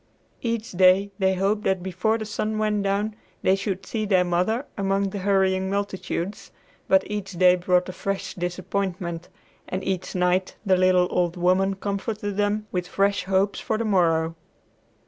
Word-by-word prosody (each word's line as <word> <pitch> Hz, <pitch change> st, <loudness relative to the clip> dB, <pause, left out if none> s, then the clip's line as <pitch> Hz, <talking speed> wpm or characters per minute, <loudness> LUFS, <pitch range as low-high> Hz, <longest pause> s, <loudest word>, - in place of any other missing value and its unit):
Each 230 Hz, -2 st, -2 dB
day 185 Hz, +2 st, +4 dB
they 190 Hz, -1 st, +2 dB
hoped 200 Hz, +3 st, +1 dB
that 190 Hz, -2 st, +1 dB
before 190 Hz, +4 st, 0 dB
the 220 Hz, -, -5 dB
sun 215 Hz, +1 st, -2 dB
went 215 Hz, -1 st, +1 dB
down 200 Hz, +2 st, -1 dB, 0.3 s
they 190 Hz, -, +4 dB
should 195 Hz, -1 st, -3 dB
see 220 Hz, -2 st, -2 dB
their 190 Hz, -3 st, +3 dB
mother 180 Hz, +9 st, 0 dB
among 195 Hz, -1 st, 0 dB
the 200 Hz, -, -4 dB
hurrying 190 Hz, -1 st, +2 dB
multitudes, 200 Hz, -1 st, -3 dB, 0.4 s
but 190 Hz, 0 st, +4 dB
each 205 Hz, -2 st, -5 dB
day 180 Hz, +1 st, +5 dB
brought 180 Hz, 0 st, +1 dB
a 185 Hz, -, -6 dB
fresh 195 Hz, +1 st, -3 dB
disappointment, 180 Hz, -1 st, -3 dB, 0.4 s
and 190 Hz, +1 st, -3 dB
each 190 Hz, -1 st, -3 dB
night 180 Hz, +1 st, +1 dB
the 190 Hz, -2 st, +4 dB
little 185 Hz, -1 st, +4 dB
old 175 Hz, 0 st, 0 dB
woman 185 Hz, +2 st, +2 dB
comforted 205 Hz, +1 st, -3 dB
them 205 Hz, +1 st, 0 dB
with 180 Hz, -1 st, -2 dB
fresh 200 Hz, -1 st, +1 dB
hope 195 Hz, +1 st, +1 dB
for 220 Hz, -, -2 dB
the 230 Hz, -, -2 dB
morrow. 165 Hz, -5 st, +2 dB
190 Hz, 165 wpm, -24 LUFS, 180-205 Hz, 0.4 s, day